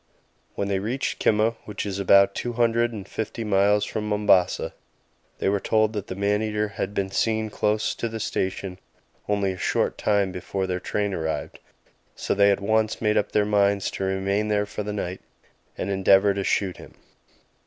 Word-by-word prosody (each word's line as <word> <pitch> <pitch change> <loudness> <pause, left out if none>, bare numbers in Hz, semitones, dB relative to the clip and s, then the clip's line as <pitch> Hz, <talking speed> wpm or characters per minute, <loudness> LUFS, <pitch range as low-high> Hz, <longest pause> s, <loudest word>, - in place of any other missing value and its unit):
When 100 - -2
they 100 -1 0
reached 120 +7 -2
Kimaa, 110 +1 +2
which 105 -1 -5
is 100 -1 -3
about 100 0 +5
two 120 +3 -3
hundred 120 0 +2
and 105 -4 -7
fifty 110 +2 -4
miles 105 0 +3
from 105 -1 -4
Mombasa, 105 -3 +2 0.6
they - - -1
were 100 +1 +2
told 110 +1 +1
that 105 -2 -4
the 95 - -5
man 100 +1 +1
eater 105 -1 -1
had 100 0 -4
been 95 -1 -1
seen 110 +1 0
close 105 +1 0
to 115 - -3
the 110 0 -5
station 95 -2 -3 0.5
only 100 -2 +1
a 95 - -7
short - - 0
time 100 -2 +1
before 95 +2 -3
their 90 -1 -2
train 100 +2 -2
arrived, 80 -2 -3 0.6
so - - -1
they 100 0 +5
at 100 - +1
once 110 +1 +1
made 105 -1 +1
up 105 - +1
their 105 -1 +2
minds 100 -1 +2
to - - -4
remain 95 +2 0
there 105 -1 +1
for 105 - -5
the 105 0 -4
night 95 -3 -4 0.6
and 100 - -3
endeavour 95 +1 +4
to 100 0 -2
shoot 95 -1 0
him. - - -13
100 Hz, 185 wpm, -24 LUFS, 95-105 Hz, 0.6 s, about